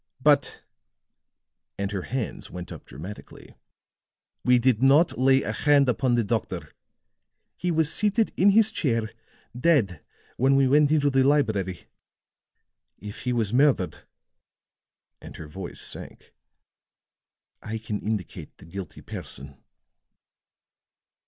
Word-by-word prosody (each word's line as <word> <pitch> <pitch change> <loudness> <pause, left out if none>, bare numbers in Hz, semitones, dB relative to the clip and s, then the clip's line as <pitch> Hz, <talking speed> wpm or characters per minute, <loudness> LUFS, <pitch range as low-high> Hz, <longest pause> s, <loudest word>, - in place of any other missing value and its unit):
"But," - - +2 1.1
and 100 0 -3
her 100 -2 -3
hands 125 +3 -5
went 90 -1 -8
up - - -10
dramatically, 85 +11 -11 0.9
"we 125 0 +5
did 120 -2 +2
not 140 +6 +4
lay 135 +1 +4
a - - -2
hand 145 -2 +3
upon 125 0 +1
the 120 - +2
doctor. 110 0 -3 0.8
He 180 - -3
was 160 -2 +1
seated 210 +1 +1
in 195 - +5
his 220 +2 +4
chair, 115 - -1 0.4
dead, 125 - +1 0.3
when 135 +2 +3
we 135 -1 +4
went 145 +2 +4
into 145 -2 +3
the 135 0 +3
library. 110 -10 +1 1.1
If 105 +4 -9
he 125 - 0
was 115 -3 -1
murdered," 130 -8 +2 1.2
and - - -11
her 80 - -9
voice 90 +4 -6
sank, - - -5 1.3
"I 110 +1 -5
can 105 -1 -4
indicate 105 -5 -5
the - - -15
guilty 95 +3 -8
person." 70 0 -8
125 Hz, 120 wpm, -25 LUFS, 100-145 Hz, 1.3 s, we